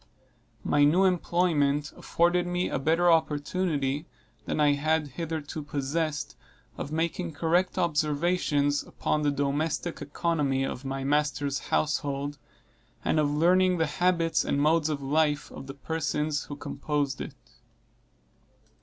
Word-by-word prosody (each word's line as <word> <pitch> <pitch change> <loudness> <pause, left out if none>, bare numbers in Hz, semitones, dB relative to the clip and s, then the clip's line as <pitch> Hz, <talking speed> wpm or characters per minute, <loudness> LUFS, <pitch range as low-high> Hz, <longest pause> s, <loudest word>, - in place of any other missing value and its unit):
My 145 - +3
new 165 +7 +5
employment 165 -5 +1
afforded 175 +1 +1
me 180 +1 0
a - - -1
better 165 +5 +3
opportunity 150 -2 0 0.4
than - - -2
I 145 -1 +5
had 155 +1 0
hitherto 155 +1 -5
possessed 150 +2 -2 0.4
of 145 - -6
making 165 +1 -2
correct 170 +4 +1
observations 150 -2 +1
upon 150 - -2
the 150 - +2
domestic 145 +4 -1
economy 145 -3 0
of 135 -1 -4
my 135 0 -3
master's 145 -1 0
household, 145 -1 -1 0.7
and 155 - +2
of 150 -1 +2
learning 180 +4 +3
the 160 - +2
habits 165 +2 +1
and 140 - 0
modes 155 +1 +3
of 145 -2 -3
life 150 +1 +1
of 135 - -9
the 135 - -7
persons 150 0 -2
who 145 - -7
composed 145 -1 -2
it. - - -6
150 Hz, 125 wpm, -27 LUFS, 145-165 Hz, 0.7 s, new